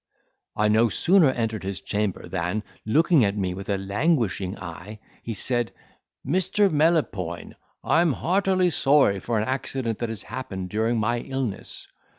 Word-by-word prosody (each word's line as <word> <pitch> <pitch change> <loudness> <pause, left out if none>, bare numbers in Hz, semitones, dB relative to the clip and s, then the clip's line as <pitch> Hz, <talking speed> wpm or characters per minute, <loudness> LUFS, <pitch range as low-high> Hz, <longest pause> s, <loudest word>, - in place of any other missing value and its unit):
I 105 - +2
no 110 +2 +4
sooner 170 - +4
entered 115 -5 -2
his 95 0 -4
chamber 105 -2 -2
than, 95 +3 -2 0.2
looking 155 - +4
at 100 0 0
me 95 -3 -1
with 95 +2 -8
a 100 - +1
languishing 100 - 0
eye, 90 +5 -9 0.2
he 115 - -5
said, 120 +1 -1 0.5
"Mr. 185 +6 +2
Melopoyn, 145 - 0 0.3
I'm 165 -2 +3
heartily 185 - +1
sorry 135 -10 +3
for 115 +3 -2
an 110 - 0
accident 130 -3 -2
that 120 - -2
has 110 -4 -4
happened 105 -7 -6
during 110 +2 +1
my 120 +3 0
illness. 130 -5 -4
115 Hz, 150 wpm, -25 LUFS, 100-145 Hz, 0.5 s, no